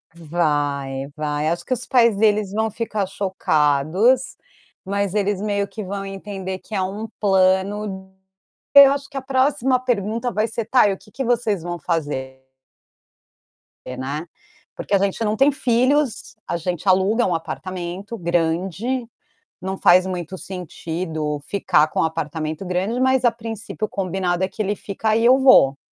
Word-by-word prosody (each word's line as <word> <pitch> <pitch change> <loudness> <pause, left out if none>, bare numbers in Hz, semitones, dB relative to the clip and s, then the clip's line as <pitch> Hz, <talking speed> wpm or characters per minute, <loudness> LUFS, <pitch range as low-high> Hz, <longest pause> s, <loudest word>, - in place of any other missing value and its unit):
Vai, 145 -5 -1
vai. 150 0 -2
Acho 170 +1 -2
que 255 - -1
os 250 0 -4
pais 235 -4 +4
deles 210 -2 +2
vão 220 +2 -1
ficar 215 -2 -2
chocados, 185 - +1 0.5
mas 200 0 -2
eles 205 -2 0
meio 200 -1 -1
que 215 +1 -7
vão 195 +1 -5
entender 195 -1 -6
que 220 - -14
é 195 - 0
um 200 +4 -4
plano 190 0 +1 0.6
eu 280 -1 +10
acho 280 0 -5
que 280 - -7
a - - -2
próxima 265 -1 +2
pergunta 230 0 -1
vai 215 0 0
ser: 225 0 -4
"Tá, 240 -1 +4
e 200 - +1
o - - -7
que 210 +2 -20
que 270 - -4
vocês 230 -7 0
vão 175 0 -4
fazer?" 140 -6 -3 1.4
Porque, 130 0 -7
né. 140 +5 -4 0.5
Porque 205 - -1
a - - +6
gente 200 +2 -1
não 210 0 0
tem 275 +6 +4
filhos, 255 -1 +1
a - - -2
gente 175 +2 -4
aluga 195 +6 +3
um 180 - +1
apartamento 185 +5 -5
grande, 175 +8 -1 0.6
não 190 +1 -4
faz 180 +1 +6
muito 180 -1 -4
sentido 160 -4 -4
ficar 155 -6 +2
com - - -1
apartamento 160 +1 -3
grande, 185 +6 -1
mas 260 0 +2
a 240 - +6
princípio 225 -1 -5
o - - -21
combinado 185 -2 -1
é - - -1
que 195 - -13
ele 205 0 -1
fica 215 +3 -2
e 230 - +1
eu 255 +2 +6
vou, 255 - +6
195 Hz, 160 wpm, -21 LUFS, 170-225 Hz, 1.4 s, eu